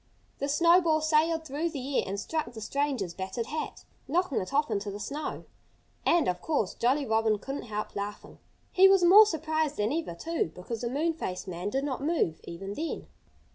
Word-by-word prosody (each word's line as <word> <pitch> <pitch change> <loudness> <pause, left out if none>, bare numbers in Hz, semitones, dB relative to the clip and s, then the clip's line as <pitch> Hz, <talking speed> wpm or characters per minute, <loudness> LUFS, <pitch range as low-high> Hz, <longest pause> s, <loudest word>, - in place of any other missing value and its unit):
The 280 - -2
snowball 335 +1 +4
sailed 320 +1 +2
through 305 +4 -2
the 275 -3 -2
air - - +1
and 200 +1 -3
struck 310 +2 -3
the 225 - -8
stranger's 255 -6 -1
battered 190 +5 -4
hat, 310 +5 -5 0.2
knocking 335 -1 +1
it 185 - -6
off 290 +2 +1
into 205 0 -1
the 200 +1 -6
snow. 290 +8 -5 0.6
And, 340 -2 +4
of 180 - -1
course, 285 -12 0
Jolly 270 +4 +1
Robin 220 -2 +2
couldn't 270 +7 -6
help 210 0 -4
laughing. 205 0 -6 0.3
He 385 -1 +7
was 385 -2 +5
more 405 +5 +9
surprised 315 -3 -1
than 210 +5 0
ever, 320 - -3
too, 325 - -2
because 220 +5 -6
the 240 - -2
moon 310 +6 0
faced 190 - -5
man 180 +2 -3
did 270 +6 -1
not 275 -3 -3
move 285 - 0
even 195 +4 -6
then. 320 +8 -4
280 Hz, 190 wpm, -29 LUFS, 210-320 Hz, 0.6 s, more